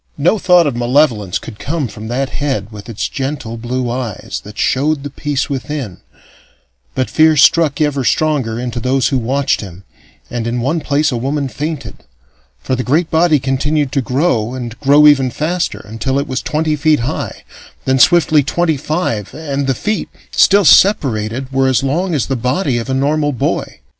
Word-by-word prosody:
No 175 +9 +2
thought 180 -2 +4
of 140 -4 -1
malevolence 120 -5 +1
could 110 -3 -10
come 150 -2 -2
from 110 0 -9
that 130 +3 -2
head 130 -8 -3
with 105 +1 -10
its 110 - -3
gentle 135 -4 -4
blue 120 +2 -3
eyes 120 -4 -4
that 105 0 -12
showed 145 +2 0
the 145 - -6
peace 140 -1 -2
within, 135 - -4 1.0
but 130 - 0
fear 155 -1 +3
struck 150 +1 +4
ever 145 -3 0
stronger 130 -6 0
into 120 -1 -4
those 130 +2 +1
who 135 -3 0
watched 135 +4 0
him, 95 -2 -10 0.5
and 120 -1 -3
in 120 +1 -1
one 140 +8 0
place 145 +1 +1
a 125 - -1
woman 140 +3 -2
fainted; 150 +5 -5 0.6
for 130 - -2
the 130 - -2
great 155 +7 0
body 160 -1 +4
continued 140 +2 0
to 135 - 0
grow, 125 -3 0
and 120 -3 -6
grow 145 +2 +5
ever 135 -3 +5
faster, 165 +7 -2
until 115 +5 -2
it 140 +1 -1
was 130 -2 -2
twenty 155 0 -1
feet 150 -2 +2
high, 120 - -4 0.4
then 130 0 +2
swiftly 155 +1 +5
twenty 160 +3 0
five, 140 - -2
and 140 -3 -3
the 135 - +1
feet, 215 - -2 0.2
still 200 -1 +4
separated, 130 - +3
were 135 0 +2
as 130 -1 +2
long 170 +6 0
as 140 - 0
the 135 - -2
body 125 +2 0
of 115 - -6
a 130 - 0
normal 145 +2 +1
boy. 125 - -2
135 Hz, 180 wpm, -16 LUFS, 120-150 Hz, 1.0 s, grow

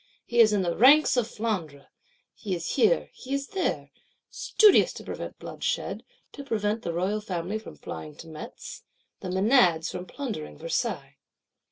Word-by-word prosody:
He 240 - -1
is 220 -2 +7
in 205 -2 +1
the 170 -1 -1
ranks 280 +6 +6
of 245 -3 +1
Flandre; 185 -12 -4 0.5
he 195 -4 -4
is 170 -1 -4
here, 280 - +2
he 265 +2 -4
is 275 0 -4
there: 385 -2 -2 0.4
studious 425 -3 +4
to - - -9
prevent - - -7
bloodshed; 485 0 -3 0.3
to 280 - -9
prevent 220 -3 -1
the 170 - -3
Royal 190 +5 -1
Family 190 +1 -3
from 220 - -11
flying 150 -1 -8
to 165 - -12
Metz; 155 -1 -9 0.4
the 185 - -6
Menads 185 -4 +3
from 180 0 -6
plundering 225 - -6
Versailles. - - -3
210 Hz, 160 wpm, -27 LUFS, 175-255 Hz, 0.5 s, is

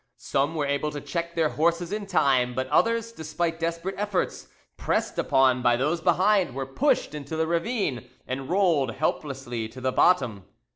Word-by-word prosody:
Some 145 +4 -1
were 150 -2 0
able 140 +2 0
to 145 0 -5
check 170 +3 -4
their 160 -2 +2
horses 170 +4 0
in 210 -1 -4
time, 130 -9 +2
but 130 +1 -1
others, 230 +8 +2
despite 165 -2 -3
desperate 170 +3 -2
efforts, 205 -3 -2 0.3
pressed - - -1
upon 130 -2 +3
by 120 -1 +4
those 155 +6 0
behind, 185 -3 +2
were 135 0 -3
pushed 150 - +1
into 150 +1 -6
the 160 0 +1
ravine, 170 - -1 0.2
and 130 +1 -5
rolled 165 - +2
helplessly 125 -6 -3
to 125 +3 -11
the 130 0 0
bottom. 120 - +2
155 Hz, 165 wpm, -26 LUFS, 135-175 Hz, 0.3 s, by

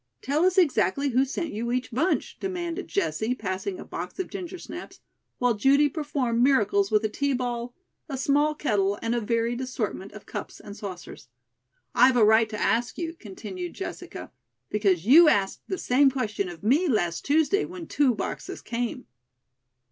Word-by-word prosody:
"Tell 295 +6 +1
us 370 0 +2
exactly 280 - +3
who 255 +1 +3
sent 305 +4 -3
you 235 +3 -3
each 255 +1 -2
bunch?" 320 +10 0
demanded 360 -1 -4
Jessie, 250 - -1
passing 210 - -4
a - - -8
box - - -6
of 375 - -4
ginger 370 -2 -6
snaps, - - -9 0.4
while 245 -1 +2
Judy 275 +7 +4
performed 275 -6 -1
miracles 205 -7 +3
with 215 0 +2
a - - +2
tea 280 +6 -1
ball, 245 -1 -3 0.3
a 275 - -3
small 290 +3 +2
kettle 205 -8 0
and 230 +1 0
a 240 - 0
varied 230 +2 0
assortment 220 -6 -4
of 210 - -11
cups - - -7
and 200 - -10
saucers. 185 -10 -8 0.7
"I - - +7
have 260 -1 +2
a 220 - +6
right 220 +1 +5
to 215 -1 -5
ask 240 +2 0
you," 330 -1 -3
continued 195 - -8
Jessica, 380 - -7 0.4
"because 195 -5 +1
you 310 +7 +8
asked 195 -7 +1
the 375 - -2
same 270 -2 +4
question 215 -7 -2
of 175 +1 -11
me 285 - +3
last 175 - 0
Tuesday 315 +7 +2
when 355 -2 -7
two 275 -6 +2
boxes - - -5
came." 240 0 -3
245 Hz, 175 wpm, -26 LUFS, 215-295 Hz, 0.7 s, you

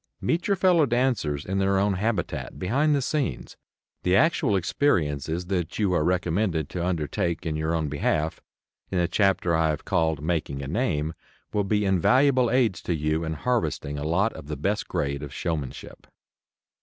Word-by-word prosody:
Meet 170 +2 0
your 200 - +3
fellow 175 -5 +4
dancers 120 - 0
in 95 +1 -1
their 95 0 +2
own 100 +1 +2
habitat, 100 -1 -2
behind 140 +11 +2
the 140 - 0
scenes. 140 - -2 0.5
The 90 +1 +2
actual 125 -4 +3
experiences 85 - 0
that 90 -3 -2
you 100 -4 +1
are 85 - +2
recommended 90 -2 0
to 90 - -3
undertake 85 0 -1
in 80 -2 -1
your 80 +2 -1
own 80 -2 -1
behalf 75 +2 -1 0.5
in 95 - -2
the 85 -1 +2
chapter 90 -2 +2
I 80 -1 +2
have 75 -1 -3
called 80 -4 +1
"Making 75 -4 -2
a - - -5
Name" 80 - -1 0.4
will 105 -1 +1
be 105 +1 +1
invaluable 125 - +3
aids 115 -7 +2
to 85 - -1
you 75 +1 0
in 80 0 -2
harvesting 80 - -1
a - - -4
lot 90 +8 +1
of 75 -2 -10
the 75 - -4
best - - -1
grade 70 0 -2
of 75 -2 -7
showmanship. 75 -4 -5
90 Hz, 175 wpm, -25 LUFS, 80-105 Hz, 0.5 s, fellow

